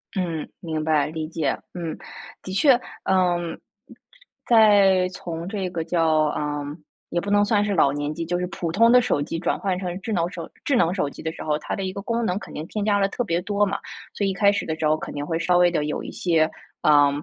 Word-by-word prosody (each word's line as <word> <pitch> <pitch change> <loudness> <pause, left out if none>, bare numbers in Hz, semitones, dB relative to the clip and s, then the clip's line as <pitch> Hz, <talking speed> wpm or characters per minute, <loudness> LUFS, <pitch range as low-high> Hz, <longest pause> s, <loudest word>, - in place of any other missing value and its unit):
嗯， 170 -5 -2
明 160 -2 -3
白。 155 -2 +2
理 155 0 -4
解， 155 -4 -1 0.2
嗯。 170 -3 -5 0.4
的 185 - -7
确， 250 +4 +5 0.2
呃， 185 -2 +2 1.1
在 200 -5 +5
从 170 -2 -6
这 195 -3 -3
个 170 -2 -3
叫， 165 0 +1 0.2
呃， 145 -1 -2 0.4
也 175 - 0
不 200 - -4
能 205 0 +4
算 205 0 +2
是 205 -1 0
老 140 -5 +4
年 145 +1 -3
机， 165 +1 -4
就 175 +2 -1
是 180 - -2
普 170 -1 -4
通 230 +7 +5
的 250 0 +7
手 240 -12 0
机 150 - -3
转 165 - -1
换 190 -2 -1
成 180 -1 -4
智 220 +3 -3
能 170 -2 +1
手 - - -7
智 280 - +1
能 175 -8 +3
手 165 -7 -1
机 - - -11
的 160 - -3
时 - - -8
候， 150 -1 0
它 - - -4
的 195 - -4
一 190 - -2
个 200 - -6
功 230 +2 -1
能 180 -1 0
肯 - - -11
定 155 - -5
添 210 +1 -3
加 205 -1 +3
了 195 - +3
特 245 - -2
别 170 -5 -1
多 205 +2 +1
嘛， 200 0 -2 0.3
所 205 - -1
以 - - +1
一 - - -1
开 200 +1 +4
始 205 - -2
的 160 - -3
时 155 - +1
候 155 - +3
肯 - - -7
定 145 0 -4
会 165 +1 -1
稍 175 +1 +2
微 175 0 +5
的 165 -4 0
有 150 - -3
一 - - -6
些 165 -3 +2 0.3
啊， 145 -1 +5
180 Hz, 265 characters per minute, -23 LUFS, 160-200 Hz, 1.1 s, 的